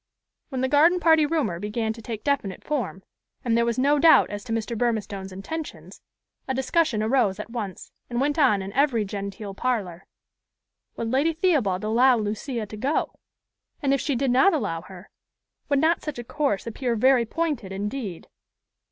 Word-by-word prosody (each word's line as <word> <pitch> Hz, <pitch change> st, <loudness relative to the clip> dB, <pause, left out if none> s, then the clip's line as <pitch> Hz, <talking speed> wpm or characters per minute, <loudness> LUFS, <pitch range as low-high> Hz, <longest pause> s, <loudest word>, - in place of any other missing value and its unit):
When 260 Hz, -3 st, -3 dB
the 260 Hz, -, +2 dB
garden 320 Hz, +6 st, +4 dB
party 320 Hz, -3 st, +4 dB
rumor 280 Hz, -, -1 dB
began 220 Hz, +2 st, -2 dB
to 230 Hz, -, -11 dB
take 220 Hz, -1 st, -6 dB
definite 270 Hz, -10 st, -1 dB
form, 240 Hz, -10 st, -3 dB, 0.4 s
and 230 Hz, -2 st, +2 dB
there 235 Hz, 0 st, +2 dB
was 235 Hz, -, 0 dB
no 285 Hz, +3 st, +3 dB
doubt 320 Hz, +2 st, +6 dB
as 205 Hz, 0 st, -5 dB
to 235 Hz, -, -7 dB
Mr. 225 Hz, +1 st, -2 dB
Burmistone's 210 Hz, -4 st, -2 dB
intentions, 295 Hz, +12 st, -7 dB, 0.5 s
a 265 Hz, -, -1 dB
discussion 265 Hz, -3 st, +1 dB
arose 220 Hz, -4 st, +2 dB
at 210 Hz, -, -7 dB
once, 210 Hz, -6 st, -6 dB, 0.2 s
and 240 Hz, 0 st, -2 dB
went 290 Hz, +3 st, 0 dB
on 210 Hz, -9 st, +4 dB
in 195 Hz, +1 st, -7 dB
every 255 Hz, -5 st, +2 dB
genteel 200 Hz, 0 st, -6 dB
parlor. 195 Hz, -7 st, -2 dB, 0.9 s
Would 230 Hz, 0 st, -3 dB
Lady 290 Hz, +6 st, +2 dB
Theobald 285 Hz, -, +1 dB
allow 240 Hz, +4 st, +4 dB
Lucia 220 Hz, +3 st, -3 dB
to 210 Hz, -, -9 dB
go? 275 Hz, +8 st, -1 dB, 0.6 s
and, 275 Hz, -3 st, +1 dB
if 275 Hz, -, +1 dB
she 285 Hz, -, -1 dB
did 260 Hz, +1 st, +1 dB
not 295 Hz, +9 st, +5 dB
allow 200 Hz, -, -2 dB
her, 185 Hz, +2 st, -13 dB, 0.6 s
would 285 Hz, -, +3 dB
not 320 Hz, +4 st, +2 dB
such 300 Hz, -4 st, -5 dB
a 240 Hz, -, -5 dB
course 275 Hz, -5 st, -1 dB
appear 235 Hz, +1 st, -2 dB
very 255 Hz, +2 st, +4 dB
pointed 295 Hz, -, -2 dB
indeed? 205 Hz, -1 st, -5 dB
240 Hz, 175 wpm, -25 LUFS, 205-280 Hz, 0.9 s, doubt